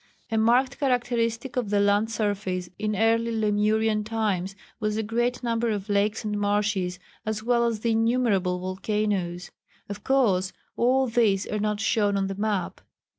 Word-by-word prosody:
A 225 - +1
marked 250 +4 +2
characteristic 245 -1 0
of 240 -5 -1
the 205 0 +2
land 205 +2 +2
surface 200 -5 -2
in 215 0 -1
early 225 +2 +2
Lemurian 215 0 +1
times 205 -4 -2 0.2
was 215 -1 -1
the 220 - -1
great 240 +3 -1
number 230 0 0
of 205 -1 -3
lakes 205 +2 +1
and 210 -1 -2
marshes, 205 -3 0 0.3
as 215 0 -3
well 235 0 +2
as 225 -2 -2
the 230 - +1
innumerable 225 -5 +1
volcanoes. 185 -1 -2 0.4
Of 205 0 -7
course, 200 -9 +2 0.2
all 260 +2 +3
these 220 -5 +2
are 210 - -3
not 210 0 -1
shown 205 -2 +2
on 195 - 0
the 195 - -3
map. 205 -2 -2
215 Hz, 160 wpm, -26 LUFS, 200-230 Hz, 0.4 s, all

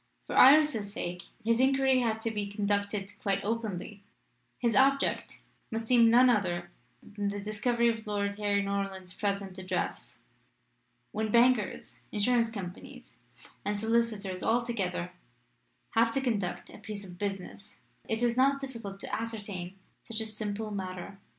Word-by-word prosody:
For - - -5
Iris's 270 -7 +6
sake 180 -1 -5 0.2
his 230 +1 +3
inquiry 265 0 +4
had 225 -2 0
to 225 - 0
be 210 -2 -2
conducted 200 -1 -1
quite 195 -1 0
openly. 210 -3 -3 0.6
His 235 -3 +1
object 275 +3 +2 0.3
must 225 0 -3
seem 235 -2 +6
none 245 +3 +7
other 175 -7 +1 0.3
than 205 0 -4
the 205 0 -4
discovery 235 +3 +1
of 225 -2 -1
Lady 200 0 -2
Harry 200 -1 +2
Norland's 195 -2 -3
present 200 -2 -2
address. 185 -1 -4 0.9
When 220 +1 -1
bankers, 235 -2 +2
insurance 230 +2 +2
companies, 190 -5 -8 0.5
and 205 0 -1
solicitors 215 -4 0
altogether 220 -7 0 0.8
have 230 0 +3
to - - +3
conduct 210 -8 -2
a - - -12
piece 205 -2 -7
of 180 -1 -12
business 200 +1 -5 0.3
it 225 +2 0
is 235 -1 +2
not 275 +2 +4
difficult 230 -8 -7
to - - -3
ascertain 205 -5 -5 0.3
such 230 -1 -5
a 220 - -1
simple 215 0 -4
matter. 190 0 -5
210 Hz, 140 wpm, -30 LUFS, 200-230 Hz, 0.9 s, none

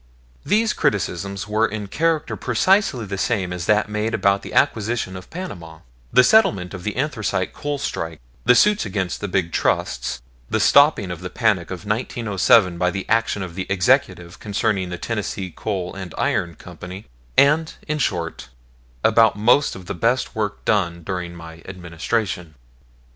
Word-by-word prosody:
These 220 +3 +2
criticisms 100 0 -1
were 110 +2 +2
in 105 0 -5
character 160 +8 0
precisely 130 - +2
the 95 -1 -5
same 95 -7 0
as 90 -1 -5
that 105 0 +3
made 105 +2 -1
about 100 -1 +2
the - - -9
acquisition 110 -3 +1
of 90 0 -10
Panama, 85 - -8 0.3
the 125 - +6
settlement 110 - +3
of 90 -2 -7
the 105 - -3
anthracite 110 -9 -1
coal 145 0 -3
strike, 80 - -4 0.2
the 125 - +5
suits 210 +8 +4
against 95 -3 -3
the 105 - -2
big 90 -3 -1
trusts, - - -1 0.3
the - - 0
stopping 140 - +5
of 90 -1 -6
the 90 - -5
panic 105 -8 +1
of 95 +2 -7
1907 105 -4 +2
by 90 - +2
the 95 +1 -5
action 115 -3 +1
of 90 -2 -7
the 95 +1 -5
Executive 95 -4 +1
concerning 100 -2 -1
the 90 - -5
Tennessee 100 -3 -4
Coal 95 -5 -3
and 95 -3 -8
Iron 85 -1 0
Company; 90 +3 -10 0.3
and, 155 +3 +4
in 155 -1 -1
short, 85 - -2 0.5
about 110 -1 +5
most 120 +7 +3
of 95 - -10
the 100 - -4
best 115 +7 0
work 105 -2 -3
done 85 -5 0
during 90 -1 -4
my 80 -1 -11
administration. 90 -1 -3
100 Hz, 160 wpm, -21 LUFS, 90-115 Hz, 0.5 s, the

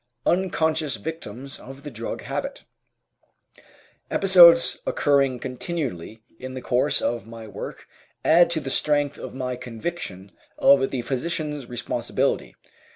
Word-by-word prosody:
UNCONSCIOUS 160 -5 +1
VICTIMS 140 -4 -7
OF 135 +1 -11
THE 145 - -7
DRUG 115 -1 -5
HABIT - - -4 1.5
Episodes 175 -3 +7
occurring 140 -3 +2
continually 125 - -5 0.2
in 130 0 -7
the 130 - -5
course 130 +4 +1
of 120 -2 -2
my 115 -1 -9
work 105 - -8 0.4
add 170 +2 +6
to 170 -2 0
the 135 -3 -5
strength 145 -1 +1
of - - -8
my 125 -1 -3
conviction 115 - -6 0.3
of 135 -1 +5
the 125 -3 -3
physician's 150 +1 -3
responsibility. 120 -1 -2
135 Hz, 120 wpm, -24 LUFS, 125-160 Hz, 1.5 s, Episodes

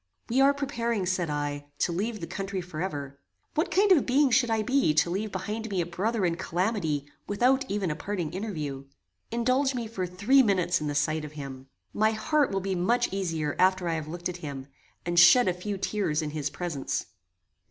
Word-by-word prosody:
"We 255 +3 +3
are 275 +1 +6
preparing," 235 -7 -2
said 180 -2 0
I, 145 -1 -3
"to 175 - +1
leave 215 +5 -2
the - - -3
country 195 +1 -4
forever: 155 -5 -5 0.3
What 315 - 0
kind 400 +1 +3
of 335 -6 +6
being 270 +1 +4
should 245 0 +3
I 220 -1 +1
be 250 - +2
to 155 +3 +3
leave 205 +3 -2
behind 220 +3 -4
me 195 -2 -1
a 170 - +1
brother 195 +4 -1
in 170 -1 0
calamity 170 -6 -1 0.2
without 255 +6 +2
even 195 -4 -1
a - - -2
parting 175 -2 -4
interview? 155 -9 -4 0.4
Indulge 255 +3 +1
me 240 -2 -2
for 190 -5 -3
three 205 +10 +4
minutes 185 -8 +2
in 150 - -2
the 145 - -2
sight 155 +2 +1
of 150 0 -8
him. 135 -3 -8 0.3
My 215 +1 +2
heart 290 +6 +1
will 195 0 -1
be 195 0 -2
much 230 +6 +1
easier 165 -6 -2
after 185 -1 +3
I 165 - 0
have 155 -2 -3
looked 175 +2 -4
at 180 -1 -5
him, 140 -5 -6 0.4
and 175 0 +3
shed 185 +8 +8
a 180 - +3
few 195 +3 -4
tears 185 -6 -1
in 150 - -3
his 150 -1 -2
presence." 160 -4 -3
185 Hz, 205 wpm, -27 LUFS, 160-225 Hz, 0.4 s, shed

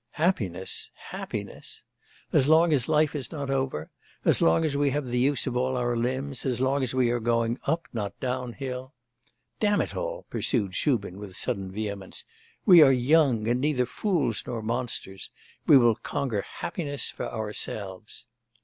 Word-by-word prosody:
Happiness! 105 - -1 0.2
happiness! - - -6 0.5
as 135 - +4
long 160 +1 +5
as 130 -2 +1
life 155 -1 +3
is 145 -4 -4
not 140 -4 -4
over, 130 - -2 0.3
as - - +4
long 120 - +4
as 145 -2 -1
we 145 0 +2
have 145 +1 -1
the 125 0 -1
use 140 +2 +2
of 130 -3 -2
all 130 +1 0
our 120 -1 0
limbs, 130 +3 -2
as 125 -3 0
long 135 +2 +1
as 130 -1 -2
we 125 -2 +3
are 120 - 0
going 115 +1 0
up, 165 +3 0
not 105 -4 -4
down, 125 -1 -3
hill! 130 0 -6 0.6
Damn 205 -1 +2
it - - -2
all!' - - -4
pursued 100 -7 -1
Shubin 100 - 0
with 100 -3 -8
sudden 95 -5 -2
vehemence, 100 -2 -4 0.4
'we 180 -4 +9
are 140 -3 +8
young, 130 -3 +3
and 120 +2 +1
neither 140 -4 +1
fools 140 - -1
nor 115 -3 -4
monsters; 115 -4 -2 0.4
we 145 - +9
will 120 -3 +5
conquer 110 -1 -2
happiness 145 - -3
for - - -5
ourselves! 105 -2 -4
125 Hz, 165 wpm, -27 LUFS, 115-145 Hz, 0.6 s, we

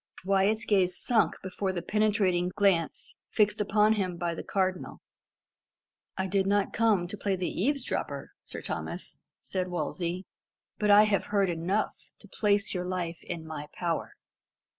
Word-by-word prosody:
Wyat's 200 +3 +2
gaze 185 -4 +2
sunk 235 -3 +2
before 190 +1 -2
the 175 -2 -4
penetrating 200 -4 +2
glance 190 -6 +1
fixed 210 -1 +2
upon 210 +1 +4
him 185 -5 -1
by 170 0 -1
the - - -5
Cardinal. 185 -2 -2 1.2
"I 190 - 0
did 190 0 +1
not 200 0 +1
come 215 -6 +2
to 200 - -5
play 200 -1 -1
the 185 -1 -3
eavesdropper, 270 +6 -2
Sir - - -8
Thomas," - - -5 0.2
said 185 -1 -2
Wolsey; 175 +2 -3 0.5
"but 210 - +1
I 205 +1 +9
have 210 -2 +1
heard 200 -3 +1
enough 165 -3 -2
to - - -16
place 205 0 +1
your 180 -1 -2
life 175 -2 -3
in 160 -1 -6
my 155 -2 -6
power. 170 -2 -2
190 Hz, 150 wpm, -29 LUFS, 175-210 Hz, 1.2 s, I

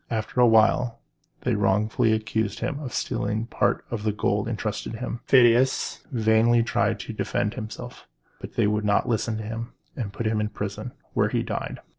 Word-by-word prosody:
After 115 +2 -1
a 120 - +7
while 115 +1 +4 0.4
they - - 0
wrongfully 105 +3 +2
accused 110 -1 -1
him 145 - -2
of 135 -5 -6
stealing 110 +1 -1
part 120 - 0
of 115 -3 -2
the 105 0 +1
gold 105 0 0
intrusted 110 -1 -3
to - - -5
him. 120 0 -4
Phidias 125 0 +4
vainly 115 0 +4
tried 115 - 0
to - - -6
defend 105 - -1
himself; 120 +3 -8 0.3
but - - -9
they - - +3
would 105 +1 +1
not 105 -1 +2
listen 115 -1 0
to 110 - -5
him, 115 +2 -5 0.2
and 110 -6 -4
put 115 +3 -5
him 110 -1 +1
in 105 - -1
prison, - - -5 0.2
where - - +2
he - - 0
died. - - -4
110 Hz, 185 wpm, -25 LUFS, 105-120 Hz, 0.4 s, a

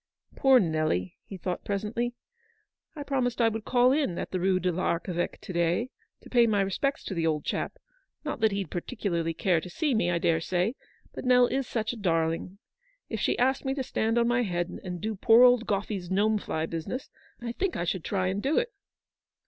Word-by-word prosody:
"Poor 265 -2 +6
Nelly," 155 - 0
he 195 - -7
thought 180 0 -4
presently. 215 +4 -2 0.8
"I 295 - -5
promised 255 -4 -1
I 230 -1 +5
would 225 -1 -5
call 250 0 +4
in 275 - +1
the - - -3
Rue 185 0 +2
do 180 0 0
l'Archeveque 175 0 -2
to 185 - -7
day, 175 +9 +1 0.3
to - - -14
pay 240 -2 +5
my 205 -2 +2
respects 235 +9 -1
to - - -4
the 165 -2 0
old 150 -2 -1
chap. - - -2 0.5
Not 295 - -3
that 220 -1 +3
he'd 195 -4 -3
particularly 170 -4 -2
care 175 -1 +2
to 180 - -8
see 300 - 0
me, 220 -6 +2
I 175 - +1
dare 165 -1 +1
say, 180 +6 0 0.4
but - - -6
Nell 250 -1 +5
is 265 +1 -1
such 220 0 -2
a - - -8
darling. 165 -1 0 0.5
If 220 - -3
she - - +1
asked 265 +2 +2
me 270 0 -1
to 270 - -2
stand 225 -2 0
on 235 0 +3
my 240 +1 +2
head, 175 -5 -2
and 180 -1 -5
do 220 +5 -2
poor 225 +5 +6
old 245 -2 +5
Gome's 195 -3 -2
gnome 210 +3 +2
fly 160 -4 -2
business, 165 - -5 0.3
I 235 -1 -4
think 360 +8 -2
I - - -1
should 175 -1 -2
try 190 -2 -1
and 190 +2 -1
do 280 +6 +1
it. 485 0 0
205 Hz, 205 wpm, -28 LUFS, 175-245 Hz, 0.8 s, Poor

